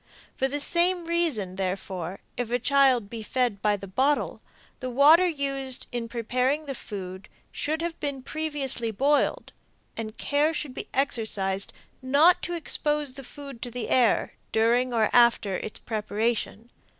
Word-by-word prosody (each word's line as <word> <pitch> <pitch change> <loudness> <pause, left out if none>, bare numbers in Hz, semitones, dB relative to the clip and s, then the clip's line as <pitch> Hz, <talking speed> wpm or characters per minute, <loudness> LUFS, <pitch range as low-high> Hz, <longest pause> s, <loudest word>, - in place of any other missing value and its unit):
For 265 - +1
the 285 +2 -3
same 345 +3 +1
reason, 305 - -1
therefore, 185 -1 -4
if 245 -2 -3
a 245 - +1
child 260 -3 +3
be 225 +2 -7
fed 230 -2 -1
by 210 -1 +2
the 195 - -8
bottle, 265 +10 0 0.4
the 255 - -4
water 300 +8 +6
used 275 -4 -2
in 235 -1 -4
preparing 255 +6 0
the 275 - -4
food 190 -5 -8 0.2
should 315 +2 -2
have 340 -1 -4
been 280 -3 -4
previously 290 -7 +1
boiled, 280 +7 +1 0.4
and 220 -1 -6
care 295 +3 +1
should 290 -4 -4
be - - -6
exercised 215 -7 0 0.3
not 285 +7 +5
to 350 - -3
expose 295 -4 -1
the 275 0 -8
food 275 -2 -10
to 245 - -4
the 240 -1 -5
air 245 -3 +3 0.2
during 240 +3 +2
or 225 -2 +3
after 235 -5 +4
its 215 - -5
preparation. 220 +1 -2
255 Hz, 150 wpm, -26 LUFS, 220-290 Hz, 0.4 s, water